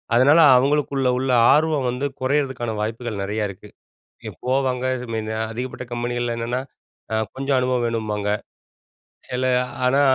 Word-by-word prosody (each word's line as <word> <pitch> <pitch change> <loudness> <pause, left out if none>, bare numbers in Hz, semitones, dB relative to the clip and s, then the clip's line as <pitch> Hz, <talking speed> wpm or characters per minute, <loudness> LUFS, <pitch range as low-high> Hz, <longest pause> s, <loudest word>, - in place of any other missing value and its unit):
அதனால 140 +7 +6 0.2
அவங்களுக்குள்ள 140 0 +1
உள்ள 130 0 0 0.2
ஆர்வம் 150 -4 +2
வந்து 125 +3 -2 0.2
குறையிறதுக்கான 130 -4 0
வாய்ப்புகள் 110 -1 -3
நெறையா 105 +2 -2
இருக்கு. 95 - -11 0.6
இ - - -4
போவாங்க 130 -1 0
இந்த 125 0 -7
மாரி 110 -1 -2 0.3
அதிகப்பட்ட 125 +2 -5
கம்பெனிகள்ல 120 0 -2
என்னன்னா, 120 +2 -2 0.5
அ - - +1 0.2
கொஞ்சம் 135 0 0
அனுபவம் 125 -1 +1
வேணும்பாங்க. 105 -3 -2 1.0
சில 125 +1 -2 0.4
ஆனா 135 +3 +3
125 Hz, 130 wpm, -22 LUFS, 115-135 Hz, 1.0 s, அதனால